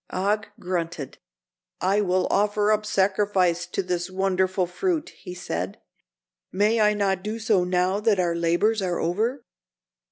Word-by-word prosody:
Og 205 +4 0
grunted. 170 -6 -4 0.6
"I 195 +3 +2
will 185 -2 +1
offer 210 +1 +2
up 215 0 +1
sacrifice 190 -3 +1
to 195 - -2
this 180 0 -2
wonderful 185 0 0
fruit," 330 - -2
he 180 -2 -10
said. 195 +3 -4 0.7
"May 210 +4 +2
I 210 0 +4
not 195 -2 0
do 215 +3 -4
so 215 -5 +2
now 180 +2 +1
that 210 -2 +2
our 175 -2 +1
labors 175 +6 +1
are 180 -2 -1
over?" 230 +9 -1
190 Hz, 140 wpm, -25 LUFS, 180-210 Hz, 0.7 s, I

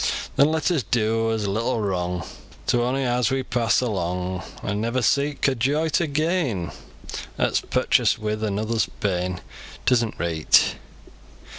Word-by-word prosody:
Then 140 +2 +5
let 160 0 +1
us 160 -6 +2
do 115 -1 +1
as 110 -2 -1
little 115 +4 0
wrong 90 -4 -2 0.4
To 120 - +2
ony 130 +3 0
as 125 -2 +1
we 135 0 0
pass 115 -4 +1
along, 90 -4 -2 0.2
An' 105 0 -1
never 120 +3 0
seek 140 +2 +2
a 135 - +3
joy 145 +6 +1
to 160 +2 +1
gain 145 - 0 0.7
At's - - +1
purchased - - +2
wi 105 0 -2
another's 110 +1 -1
pain, 90 -2 -1 0.4
It - - +3
isn't 115 -3 +2
reet. 80 -2 +3
115 Hz, 145 wpm, -24 LUFS, 100-130 Hz, 0.7 s, Then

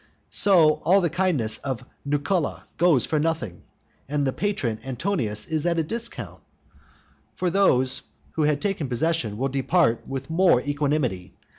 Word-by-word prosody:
So 160 -6 +5
all 190 +3 +4
the 170 -5 0
kindness 165 -11 0
of 130 -3 -5 0.2
Nucula 145 +3 -1 0.2
goes 165 -9 +4
for 155 - 0
nothing, 160 - -2 0.5
and 145 -1 0
the 135 - 0
patron 190 - -2
Antonius 130 - -2
is 155 -2 -2
at 170 -1 +1
a 165 - +2
discount. 230 +8 -5 0.9
For 180 -1 -1
those 130 -10 +3 0.3
who 160 - -2
had 150 -1 +1
taken 185 -9 -2
possession 125 -4 -1
will 135 +3 -1
depart 135 -1 +1
with 135 0 -5
more 170 -4 +4
equanimity. 140 -10 -2
150 Hz, 145 wpm, -24 LUFS, 130-175 Hz, 0.9 s, So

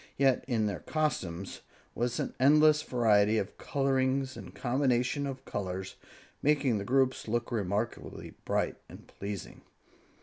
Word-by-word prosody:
Yet 135 -2 +3
in 115 -5 +1
their 100 -5 -2
costumes 95 - -2 0.3
was 120 +1 -1
an - - -2
endless 150 +3 +6
variety 110 -6 +3
of 100 -1 -3
colorings 135 -1 0
and - - -10
combinations 130 +1 +1
of 135 -1 -7
colors, 95 -1 -4 0.5
making 140 -6 +2
the - - -3
groups 130 +3 +1
look 120 +2 -1
remarkably 105 0 -3
bright - - 0
and - - -12
pleasing. 100 -2 -7
125 Hz, 130 wpm, -30 LUFS, 105-135 Hz, 0.5 s, endless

